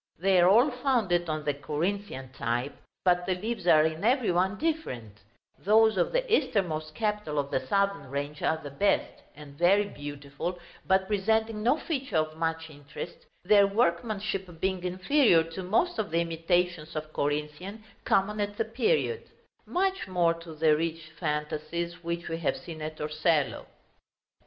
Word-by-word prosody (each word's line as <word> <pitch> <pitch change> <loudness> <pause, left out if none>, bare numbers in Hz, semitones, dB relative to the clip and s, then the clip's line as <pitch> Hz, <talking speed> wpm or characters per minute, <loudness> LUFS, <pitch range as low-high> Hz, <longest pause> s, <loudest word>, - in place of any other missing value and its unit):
They 190 +2 +3
are 175 - +6
all 240 +8 +5
founded 230 - +1
on 155 -1 -2
the 145 - +1
Corinthian 150 -1 -3
type, 120 +4 -2 0.3
but 180 -1 +3
the 185 - +1
leaves 210 0 -4
are 155 -3 +7
in 160 +2 -2
every 245 -2 +3
one 185 +4 +1
different: 125 - -3 0.4
those 220 +2 +4
of 180 - +1
the - - +1
easternmost 155 - -1
capital 210 -6 -2
of 140 -1 -1
the - - +1
southern 200 -6 0
range 145 +2 -4
are 160 - +1
the 145 -3 -9
best, 200 +9 0
and 150 -1 -12
very 190 +6 +4
beautiful, 145 +2 -6 0.3
but 190 0 +3
presenting 220 +2 +1
no 245 +7 +3
feature 270 - -2
of 155 0 0
much 160 0 -2
interest, 145 +3 -9 0.2
their 200 +1 +6
workmanship 195 -3 -1
being 190 0 -1
inferior 185 - +3
to 165 +3 -7
most 220 - +1
of 210 - -1
the 165 +1 +1
imitations 165 0 -1
of 155 0 -5
Corinthian 150 +9 -3 0.2
common 210 +2 +1
at 205 0 -3
the 225 - 0
period; 445 - 0 0.4
much 380 - 0
more 175 -3 +2
to 165 -1 -10
the 155 0 +4
rich 160 0 -3
fantasies 155 +3 -3
which 170 0 -3
we 165 0 -3
have 165 - 0
seen 160 -2 -9
at 155 0 -5
Torcello. 155 -1 0
175 Hz, 160 wpm, -28 LUFS, 155-205 Hz, 0.4 s, are